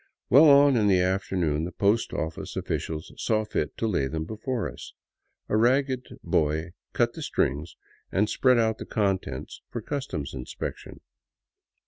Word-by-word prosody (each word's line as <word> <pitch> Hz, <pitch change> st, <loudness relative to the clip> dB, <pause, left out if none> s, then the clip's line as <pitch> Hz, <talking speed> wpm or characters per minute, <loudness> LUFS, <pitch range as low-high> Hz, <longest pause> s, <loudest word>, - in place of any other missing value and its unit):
Well 140 Hz, +6 st, +8 dB
on 140 Hz, -1 st, +7 dB
in 105 Hz, -2 st, +3 dB
the 95 Hz, -2 st, +4 dB
afternoon 90 Hz, -4 st, 0 dB
the 90 Hz, -, -4 dB
post 100 Hz, +5 st, +1 dB
oflice 80 Hz, 0 st, -4 dB
officials 80 Hz, 0 st, -4 dB
saw 110 Hz, -1 st, 0 dB
fit 75 Hz, -7 st, -3 dB
to -, -, -1 dB
lay 80 Hz, -10 st, +1 dB
them 80 Hz, +3 st, -3 dB
before 110 Hz, +4 st, -3 dB
us. -, -, -10 dB, 0.5 s
A -, -, 0 dB
ragged 130 Hz, +3 st, +2 dB, 0.2 s
boy 80 Hz, +3 st, 0 dB, 0.2 s
cut -, -, +1 dB
the -, -, -8 dB
strings 75 Hz, +5 st, -1 dB, 0.4 s
and 105 Hz, +3 st, +2 dB
spread 125 Hz, +2 st, +3 dB
out 110 Hz, -1 st, +1 dB
the -, -, -6 dB
con 100 Hz, -3 st, +1 dB
tents 65 Hz, -7 st, -8 dB
for 120 Hz, -, -4 dB
customs 110 Hz, -, -4 dB
inspection. 65 Hz, -2 st, -7 dB
100 Hz, 155 wpm, -26 LUFS, 80-115 Hz, 0.5 s, Well